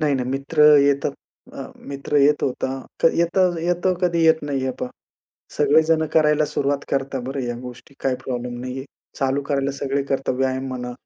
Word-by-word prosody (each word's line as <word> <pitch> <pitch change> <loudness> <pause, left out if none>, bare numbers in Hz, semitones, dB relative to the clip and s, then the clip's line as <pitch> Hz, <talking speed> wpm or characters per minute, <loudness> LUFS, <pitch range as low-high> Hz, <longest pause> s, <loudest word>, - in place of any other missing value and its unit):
नाही, 150 -2 +2
नाही 125 -1 -2
मित्र 140 +3 0 0.2
येतात. 140 0 +2 0.4
अ, - - -11 0.3
मित्र 140 +1 -3
येत 145 +1 +4
होता. 130 0 -1 0.5
येत 170 +2 +1 0.2
येतो 175 +2 +1
कधी 170 -2 +2
येत 160 -1 +4
नाही. 145 -2 -2
हे 130 - 0
पहा, 125 - -3 0.7
सगळेजणं 160 +2 +3
करायला 150 -1 +4
सुरुवात 140 -1 -1
करतात 135 -1 -1
बरं 135 +1 -3
या 120 -1 -3
गोष्टी 125 +2 -11
काही 130 -1 +1
प्रॉब्लेम 125 -1 -4
नाहीये. 130 +2 -5 0.3
चालू 135 0 +1
करायला 140 -1 0
सगळे 140 0 -2
करतात 135 -1 0
व्यायाम 130 0 -1
म्हणा, 125 -1 -5
140 Hz, 170 wpm, -22 LUFS, 130-150 Hz, 0.7 s, येत